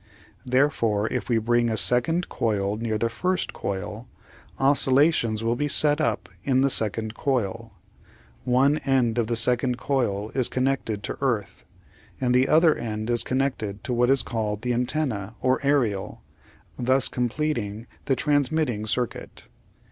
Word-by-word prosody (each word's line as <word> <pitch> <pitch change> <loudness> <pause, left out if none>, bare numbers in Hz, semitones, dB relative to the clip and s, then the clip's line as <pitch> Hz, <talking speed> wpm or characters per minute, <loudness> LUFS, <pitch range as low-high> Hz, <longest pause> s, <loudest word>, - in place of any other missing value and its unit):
Therefore, 125 -6 +1
if 125 0 -3
we 120 - +2
bring 120 +1 +1
a 110 - -1
second 125 - +3
coil 105 -3 -1
near 110 0 -3
to - - +1
the 115 - 0
first 180 +10 -2
coil, 105 +4 -5 0.5
oscillations 135 -4 +3
will 115 +1 +1
be 145 +4 -1
set 150 +1 +3
up - - -1 0.2
in 130 -1 +2
the 135 0 +2
second 110 0 0
coil. 115 -4 -2 0.7
One 135 +4 +2
end 130 -5 +1
of 115 - 0
the 120 - -1
second 125 +2 +2
coil 115 -7 -1
is 130 -2 +1
connected 130 -5 -2
to - - -5
earth, 105 -8 -2 0.5
and 125 -2 +1
the 130 +1 +3
other 160 0 +5
end 110 0 -4
is 120 - +3
connected 130 -6 -2
to 125 - -3
what 120 +1 +2
is 135 -1 +3
called 105 -3 -3
the 125 0 0
antenna 120 -5 -2
or 130 0 +1
aerial, 125 -9 0 0.6
thus 130 +1 +2
completing 120 -4 -2 0.2
the 135 - +1
transmitting 145 -6 0
circuit. 120 +1 -4
125 Hz, 150 wpm, -24 LUFS, 110-135 Hz, 0.7 s, other